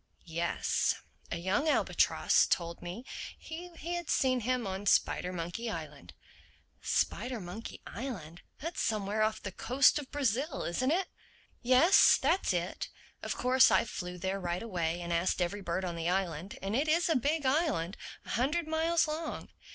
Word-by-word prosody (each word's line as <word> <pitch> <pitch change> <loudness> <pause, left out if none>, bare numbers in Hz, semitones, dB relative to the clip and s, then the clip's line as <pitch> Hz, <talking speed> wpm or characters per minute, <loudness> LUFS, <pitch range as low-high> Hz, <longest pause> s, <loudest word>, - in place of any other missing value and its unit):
"Yes. 170 0 0 0.3
A - - -2
young 190 - +1
albatross - - +3
told 170 -1 -1
me 180 +9 -7 0.3
he 340 +3 -8
had 345 0 -4
seen 255 -1 +2
him 250 0 -1
on 195 +1 -4
Spidermonkey 180 +5 +1
Island?" 150 - -7 0.7
"Spidermonkey 225 -3 -2
Island? 185 - -6 0.2
That's 330 +4 -3
somewhere 210 0 0
off 215 0 0
the 200 - -4
coast 260 +9 +3
of 280 -2 -8
Brazil, 275 +2 -1
isn't 255 +10 0
it?" 360 +5 +1 0.5
"Yes, 260 +10 +6
that's 320 - +2
it. 175 0 -2 0.3
Of - - -3
course 255 +1 +5
I - - +3
flew 180 -5 -6
there 190 +2 -2
right 175 +1 -2
away 175 -5 -2
and 170 0 -3
asked 170 +3 +1
every 185 +3 -1
bird 185 +1 -2
on 175 -2 -3
the 165 0 -1
island—and 190 +2 -2
it 285 +5 +1
is 335 +4 +3
a 325 - +2
big 290 +4 +1
island, 260 - +1 0.3
a - - -12
hundred 300 +7 0
miles 320 +1 +2
long. 310 +1 -4
220 Hz, 150 wpm, -31 LUFS, 175-285 Hz, 0.7 s, Yes